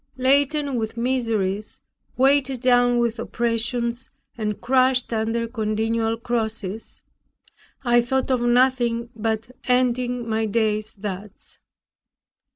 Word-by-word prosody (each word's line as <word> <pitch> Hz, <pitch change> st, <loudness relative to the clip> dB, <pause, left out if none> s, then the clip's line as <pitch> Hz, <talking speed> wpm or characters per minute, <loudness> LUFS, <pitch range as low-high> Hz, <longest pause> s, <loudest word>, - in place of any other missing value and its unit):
Laden 280 Hz, +1 st, +2 dB
with 220 Hz, +1 st, -4 dB
miseries, 225 Hz, -5 st, -1 dB, 0.4 s
weighed 270 Hz, 0 st, +3 dB
down 245 Hz, -1 st, +3 dB
with 235 Hz, -1 st, 0 dB
oppressions, 235 Hz, +1 st, 0 dB, 0.3 s
and 210 Hz, -3 st, -3 dB
crushed 255 Hz, 0 st, +2 dB
under 225 Hz, +1 st, -1 dB
continual 225 Hz, 0 st, -1 dB
crosses, 225 Hz, -3 st, -4 dB, 0.8 s
I 240 Hz, 0 st, +4 dB
thought 265 Hz, +2 st, -1 dB
of 255 Hz, -2 st, +1 dB
nothing 240 Hz, -1 st, +2 dB
but 225 Hz, +1 st, -2 dB
ending 250 Hz, -1 st, +1 dB
my 220 Hz, 0 st, 0 dB
days 215 Hz, 0 st, -1 dB
thus. 200 Hz, 0 st, -8 dB
235 Hz, 100 wpm, -23 LUFS, 220-250 Hz, 0.8 s, I